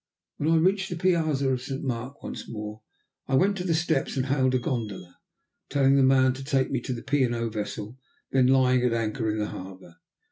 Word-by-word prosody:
When 150 - 0
I 165 - +4
reached 190 +3 +2
the 175 - -3
piazza 160 -6 +1
of 125 -1 -1
St. 135 +2 -5
Mark 130 +1 -4
once - - -7
more 105 0 -6 0.5
I 135 - +1
went 195 +8 +3
to 180 - -3
the 170 -3 +1
steps 160 -4 0
and 130 - +1
hailed 130 -1 +2
a - - +5
gondola, 110 - -4 0.5
telling 135 -1 +3
the 140 - +5
man 130 -1 +4
to 135 +1 -8
take 135 -1 0
me 130 -3 -1
to 125 - -3
the 115 - -7
P. 145 +1 +1
and 120 -2 +1
O. 115 0 -2
vessel 105 +2 -5 0.3
then 130 -1 +4
lying 130 -1 +4
at 125 -2 +2
anchor 115 0 -1
in 105 - -1
the 105 -1 -2
harbour. 95 -2 -10
130 Hz, 220 wpm, -26 LUFS, 115-140 Hz, 0.5 s, a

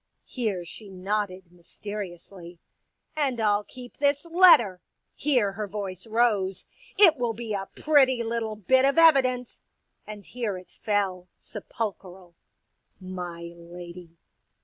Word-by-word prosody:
Here 210 -8 -3
she 205 +4 -11
nodded, 190 -1 -3
mysteriously. 180 -1 -9 0.3
*' - - -48
And 275 -6 -1
I'll 210 -1 +2
keep 250 +2 -13
this 285 +1 +1
letter." 330 - +5 0.3
Here 250 -9 +1
her 205 +1 -5
voice 195 -1 -6
rose. 215 -5 +1 0.2
*' - - -23
It 345 -7 +7
will 240 -2 -1
be 225 -1 -5
a 195 -1 -4
pretty 265 -5 +3
little 225 -1 -3
bit 260 +6 +2
of 275 +3 +2
evidence! 260 -7 +4 0.2
" - - -45
And 210 -1 -8
j - - -21
here 230 -6 -3
it 185 - -14
fell, 195 -4 -2
sepulchral, 190 -4 -7 0.4
" - - -47
My 180 -2 -7
lady.'' 170 0 -11
210 Hz, 140 wpm, -26 LUFS, 185-245 Hz, 0.4 s, It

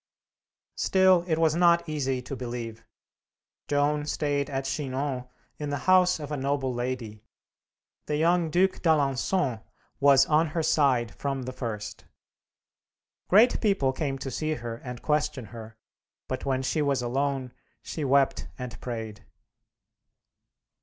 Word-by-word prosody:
Still, 190 -2 +4
it 160 -2 +1
was 160 -1 +3
not 170 0 +4
easy 135 -4 -2
to 135 - -6
believe. 120 -2 -6 0.8
Joan 145 +1 +1
stayed 145 -2 -1
at 135 -1 -3
Chinon 135 -1 -3 0.3
in 150 -1 -3
the 145 - -1
house 180 -2 +5
of 150 -1 -7
a 150 - -2
noble 135 -1 -1
lady. 120 -3 -4 0.8
The 150 - 0
young 170 +1 +2
Duc 185 +4 +2
d'Alençon 140 - +1 0.4
was 140 -1 +6
on 155 +2 +3
her 165 - +1
side 130 -9 +2
from 135 +3 -3
the 130 +1 -5
first. 110 -5 -6 1.2
Great 220 +6 +5
people 195 - +2
came 135 -1 -2
to 135 0 -5
see 155 +4 -2
her 120 -2 -6
and 125 0 -8
question 150 -4 0
her, 110 -1 -10 0.5
but 130 - -4
when 130 -1 0
she 155 +4 0
was 140 -3 +1
alone, 135 0 -1 0.3
she 155 - -5
wept 135 - +2
and 125 -1 -7
prayed. 110 -4 -6
140 Hz, 135 wpm, -27 LUFS, 125-155 Hz, 1.2 s, was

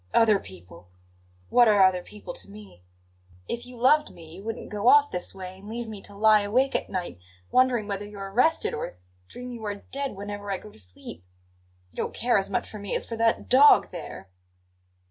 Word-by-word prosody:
"Other 215 -3 +5
people 90 - -13 0.6
what 245 -1 +6
are 205 -2 +5
other 185 -1 +4
people 210 - -10
to - - -6
me? 205 - -13 0.7
If 235 +1 -5
you 250 -1 -12
loved 300 +5 +4
me 160 -1 -14
you 190 +3 -11
wouldn't 225 0 -6
go 210 +2 -2
off 290 +2 +6
this 180 +1 -4
way 185 0 -8
and 205 +2 -12
leave 235 +1 -5
me 215 -3 -8
to 200 - -9
lie 215 0 +5
awake 250 +7 +1
at - - -1
night, 180 - -4 0.3
wondering 255 -4 +3
whether 205 0 -3
you're 200 -1 -8
arrested, 285 +10 +2
or 120 - -5 0.3
dream 250 - -8
you 235 -2 -8
are 205 -1 -2
dead 275 +4 -5
whenever 205 +1 -6
I 195 - -1
go 210 - -13
to - - -15
sleep. 90 -2 -9 0.7
You - - -24
don't - - -3
care 240 -3 +2
as 195 - -3
much 240 - -1
for 215 - -9
me 200 -1 -3
as - - -1
for 230 - -5
that 225 0 +1
dog 280 +3 +6
there!" 165 - -8
210 Hz, 205 wpm, -26 LUFS, 190-240 Hz, 0.7 s, what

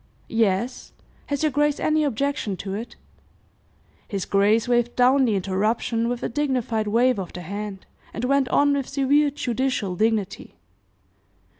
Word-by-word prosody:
"Yes. 225 +2 0 0.3
Has 285 +1 -2
your 310 - +2
grace 295 +1 +1
any 310 0 +2
objection 275 -6 -1
to 195 +1 -5
it?" 225 +4 -6 1.1
His 195 -3 -3
grace 210 +4 +2
waved 240 -1 +1
down 260 +2 +4
the 220 -4 +1
interruption 215 +5 0
with 245 0 -3
a - - 0
dignified 240 -5 -1
wave 235 +2 +2
of 185 - -6
the 180 - -7
hand, 200 +1 -6 0.3
and 235 - -4
went 275 0 +2
on 285 0 +3
with 275 -2 -2
severe 285 +2 +3
judicial 255 -7 -2
dignity. 220 +3 -1
240 Hz, 145 wpm, -23 LUFS, 210-275 Hz, 1.1 s, down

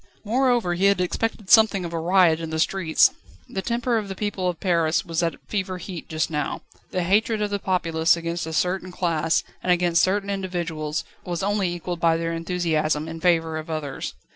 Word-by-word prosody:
Moreover, 240 -4 +2
he 180 +3 +1
had 200 -2 +4
expected 205 +2 -2
something 215 -5 +6
of 170 - -6
a 165 - -1
riot 170 -1 +4
in 165 -1 -5
the 160 - -3
streets. 165 0 +3 0.4
The 190 - -4
temper 235 +1 0
of 210 - -6
the 195 - -5
people 195 -3 -1
of 175 - -5
Paris 170 -4 +1
was 165 0 -1
at 170 -1 0
fever 190 -3 -2
heat 180 -2 -8
just 160 0 -1
now. 150 -2 -2 0.3
The 180 - -1
hatred 215 +4 +2
of 210 -1 -1
the 200 - -1
populace 165 -3 +2
against 170 0 -3
a 160 - -5
certain 185 +2 0
class, 165 -3 0 0.2
and 180 - +1
against 175 -1 +3
certain 200 +1 +1
individuals, 170 -5 -3 0.2
was 175 0 -3
only 200 -2 +1
equalled 175 0 -4
by 165 -1 +3
their 165 0 -2
enthusiasm 165 -3 0
in 165 0 -6
favour 165 -3 +2
of 155 - -9
others. 155 -4 -4
175 Hz, 195 wpm, -24 LUFS, 165-195 Hz, 0.4 s, something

